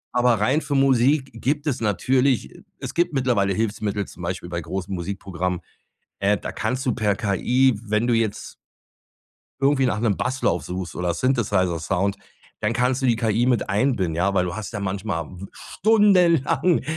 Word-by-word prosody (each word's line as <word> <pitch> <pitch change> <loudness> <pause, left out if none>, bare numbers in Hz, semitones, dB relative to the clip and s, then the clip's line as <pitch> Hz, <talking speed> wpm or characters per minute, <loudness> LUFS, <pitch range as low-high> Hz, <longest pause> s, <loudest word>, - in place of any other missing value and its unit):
Aber 125 -1 +4
rein 130 +9 +2
für 145 - -3
Musik 135 +1 +3
gibt 140 +6 -2
es 140 -6 -1
natürlich 125 +5 +1 0.2
es - - -6
gibt 175 -1 +1
mittlerweile 120 -8 +1
Hilfsmittel, 105 -1 -2
zum - - -13
Beispiel 85 - -4
bei 85 -1 -3
großen 95 +4 -5
Musikprogrammen. 90 -1 -3 0.6
Äh, 100 +1 +2
da - - -6
kannst 130 +2 -2
du 125 - +2
per 105 -4 0
KI, 120 +4 +1
wenn 110 +1 0
du 120 - +2
jetzt 115 -3 -1 1.1
irgendwie 135 -1 +3
nach 110 - -1
'nem 110 -4 +1
Basslauf 125 -8 0
suchst 90 -1 -5
oder 90 -1 -1
Synthesizer-Sound, 95 - 0 0.4
dann 105 +1 0
kannst 125 +3 0
du 130 - +2
die 115 -2 +3
KI 115 +1 +1
mit 125 -4 +1
einbinden, 100 - +1
ja. 90 +4 +1
Weil 90 - +2
du 90 -1 -4
hast 110 +1 -6
ja 100 - -4
manchmal 95 -4 -3
w 95 +3 -10
stundenlang 180 - +3
110 Hz, 165 wpm, -23 LUFS, 95-130 Hz, 1.1 s, Aber